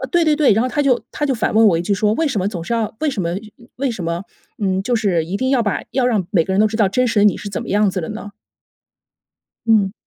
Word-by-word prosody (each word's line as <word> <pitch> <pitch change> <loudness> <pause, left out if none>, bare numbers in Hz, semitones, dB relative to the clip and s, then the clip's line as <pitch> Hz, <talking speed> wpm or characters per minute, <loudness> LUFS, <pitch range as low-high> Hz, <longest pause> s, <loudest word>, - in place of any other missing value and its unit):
呃， 265 - -3
对 345 -1 +3
对 305 -1 +3
对， 295 -7 +4
然 220 +3 +2
后 255 - 0
他 290 - -1
就 265 -4 +2
他 295 - -2
就 270 - 0
反 220 - -1
问 225 +1 +6
我 185 -5 +4
一 170 - -2
句 200 - -1
说： 210 +1 +1
“为 320 +5 0
什 255 -7 -2
么 190 - 0
总 180 -5 -4
是 195 - -4
要 225 -2 -1
为 310 -2 +1
什 215 - -3
么 170 - -1 0.5
为 275 0 -1
什 200 -7 -5
么， 170 +2 -2 0.4
嗯， 190 -1 +1
就 245 +4 0
是 190 -8 +1
一 185 +4 -3
定 260 +3 -1
要 265 -3 +3
把 205 - -1
要 255 -2 +1
让 215 -7 +1
每 170 -6 +2
个 190 - -3
人 195 - +2
都 215 - +4
知 220 - -4
道 210 -4 +3
真 250 +6 +1
实 225 - 0
的 - - +4
你， 205 - +4
是 205 - -7
怎 195 - -4
么 - - -10
样 205 0 +3
子 185 - -3
的 165 - -5
呢？” 215 -1 -7 1.4
嗯。 210 -4 +3
215 Hz, 330 characters per minute, -19 LUFS, 195-250 Hz, 1.4 s, 问